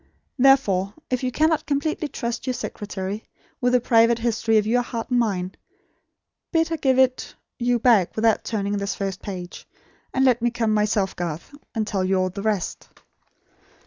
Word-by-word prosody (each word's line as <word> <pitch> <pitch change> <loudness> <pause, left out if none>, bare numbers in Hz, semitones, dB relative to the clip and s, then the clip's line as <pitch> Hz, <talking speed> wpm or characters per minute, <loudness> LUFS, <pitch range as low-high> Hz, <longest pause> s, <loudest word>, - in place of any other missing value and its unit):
Therefore, 210 -8 +4 0.2
if 255 - 0
you 255 - 0
cannot 315 +3 +1
completely 305 +1 -1
trust 235 -2 -4
your 255 - 0
secretary, 205 -2 -5 0.4
with 250 0 +2
the 250 - +5
private 230 -1 +4
history 230 -1 +1
of 210 - +2
your 240 +3 +2
heart 235 0 -5
and 245 - +3
mine, 190 -5 -1 1.0
bid 325 -1 +2
her 325 - -1
give 265 -3 +2
it 260 -1 +1 0.2
you 245 0 +2
back 225 -6 +3
without 220 -1 +2
turning 205 -2 -2
this 200 0 -2
first 195 -2 -4
page; 180 -3 -7 0.4
and 265 0 +2
let 245 -3 +3
me 240 - +2
come 230 -2 0
myself, 210 -2 +1
Garth, 170 - -5 0.2
and 220 -1 0
tell 195 -3 -1
you 190 +1 +1
all 185 0 +1
the 200 - -6
rest." 210 -4 -2
225 Hz, 175 wpm, -23 LUFS, 200-250 Hz, 1.0 s, the